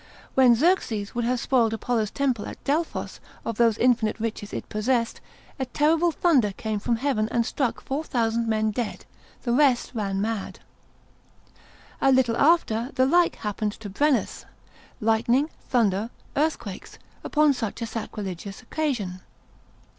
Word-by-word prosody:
When 255 -3 +6
Xerxes 230 - +1
would 240 -1 -1
have 250 +1 +1
spoiled 230 -3 +2
Apollo's 225 -1 -1
temple 260 -6 -1
at - - -9
Delphos 310 +4 -2 0.3
of 230 -2 -3
those 230 -2 +3
infinite 235 -3 +2
riches 215 -2 -4
it - - -5
possessed, 230 +2 -1 0.4
a 265 - -2
terrible 315 +6 +2
thunder 275 - +2
came 215 +1 -3
from 235 +3 0
heaven 225 -3 0
and 235 -1 +1
struck 255 -1 -1
four 280 +4 -3
thousand 230 -4 0
men 220 -1 +1
dead, 230 +1 -4 0.4
the 235 - 0
rest 260 -2 +3
ran 200 -4 -2
mad. 215 -1 -3 1.4
A 270 - +5
little 255 -3 +3
after, 265 -7 +3
the 260 -1 +4
like 345 +5 +3
happened 210 0 -3
to 210 -3 -9
Brennus, 285 +5 0 0.5
lightning, 235 +6 +2 0.2
thunder, 220 -3 +2 0.3
earthquakes, 285 -10 -2 0.3
upon 300 -1 +3
such 225 -5 -4
a - - -1
sacrilegious 205 -2 -6
occasion. 230 -10 -2
235 Hz, 140 wpm, -25 LUFS, 215-270 Hz, 1.4 s, When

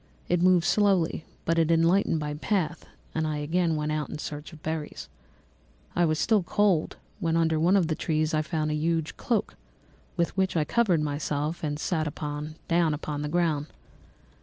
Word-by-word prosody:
It 175 -1 +2
moved 180 -1 +4
slowly, 190 -6 +2 0.2
but 165 0 +2
it 165 -1 +2
enlightened 165 +2 +3
my 150 -1 -3
path, 170 +1 -1 0.3
and 160 0 0
I 155 -1 -2
again 165 +3 +1
went 150 0 -1
out 155 -1 -2
in - - -5
search 150 0 -6
of 160 -1 -14
berries. 160 -1 -4 0.9
I 175 - +4
was 155 -1 +1
still 215 +5 +3
cold 190 -3 +1 0.2
when 165 -3 +1
under 160 -1 +2
one 180 +5 +4
of 185 - +3
the 160 - 0
trees 155 0 0
I 155 - +3
found 155 -1 -1
a - - 0
huge 160 +1 -1
cloak, 230 -4 -1 0.6
with 170 0 0
which 190 -2 +1
I 155 - +3
covered 185 -2 +2
myself, 150 +2 -2
and 145 -1 -1
sat 155 -1 -1 0.6
down 165 -2 +2
upon 145 -1 -4
the 150 - -3
ground. 160 -3 +1
160 Hz, 180 wpm, -27 LUFS, 150-175 Hz, 0.9 s, moved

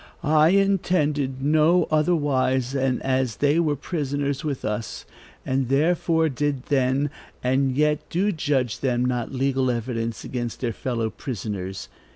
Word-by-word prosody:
"I 155 0 +4
intended 160 -9 +1
no 155 +4 +4
otherwise 145 -5 +1
than 135 -2 0
as 130 -3 0
they 145 +6 +2
were 155 -3 +1
prisoners 145 -2 -2
with 145 -4 -3
us, 105 0 -4 0.4
and 130 -1 0
therefore 160 +3 +2
did 145 -2 -2
then, 135 +1 +1 0.3
and 130 +1 +1
yet 150 0 +1
do 195 +5 +1
judge 145 - -1
them 125 -2 0
not 125 -2 -1
legal 135 0 0
evidence 115 -1 -3
against 120 -2 -4
their 120 -3 -1
fellow 115 -2 -2
prisoners. 100 -6 -5
135 Hz, 135 wpm, -24 LUFS, 125-150 Hz, 0.4 s, I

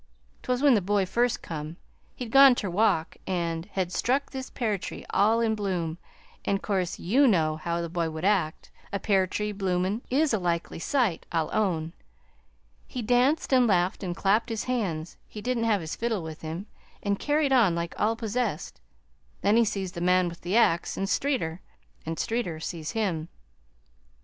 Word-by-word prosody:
"'T - - -3
was 250 +2 0
when 285 -3 +7
the 215 - +3
boy 200 +1 +1
first 240 +5 0
come. 155 0 -6 0.4
He'd 240 -3 -6
gone 270 -1 +8
ter 200 -6 -3
walk 175 -4 +1
an' 170 -3 -2
had 185 -2 -1
struck 270 +3 0
this 265 -1 -6
pear 215 -5 -1
tree, - - -7
all 220 +3 +3
in 225 -1 +2
bloom, 180 -6 -2 0.4
an' 200 - +1
'course, 190 -3 -2
YOU 260 +10 +3
know 160 -8 +2
how 170 +1 -2
the 170 - -3
boy 170 -1 -1
would 160 +2 -5
act 190 -6 0 0.2
a 200 - 0
pear 195 -2 +2
tree, 210 +3 -2
bloomin', 190 +1 -1
is 285 +1 +2
a 220 - +2
likely 170 -2 -2
sight, 230 -4 0
I'll 165 -2 0
own. 170 -6 0 0.9
He 250 - -5
danced 250 +6 +2
and 250 -2 +5
laughed 180 -2 +1
and 180 -3 -3
clapped 205 +6 +2
his 225 -2 -2
hands, 190 -11 -2
he 215 - -9
didn't 235 +1 -1
have 210 -4 +2
his 160 - -5
fiddle 225 -6 -1
with 160 0 -8
him, 165 +5 -5 0.4
an' 200 -1 0
carried 290 +1 +1
on 215 -10 +4
like 170 0 -3
all 225 +2 +2
possessed. 225 - -3 0.6
Then 205 +2 +3
he 235 - +6
sees 195 -4 -2
the 170 - -7
man 180 0 +3
with 170 - -11
the 185 +6 0
axe, 170 -7 +2
an' 195 - 0
Streeter 195 - -1 0.5
an' 165 0 -3
Streeter 225 -9 -2
sees 160 +1 -5
him. 180 -8 -1
195 Hz, 185 wpm, -27 LUFS, 170-230 Hz, 0.9 s, gone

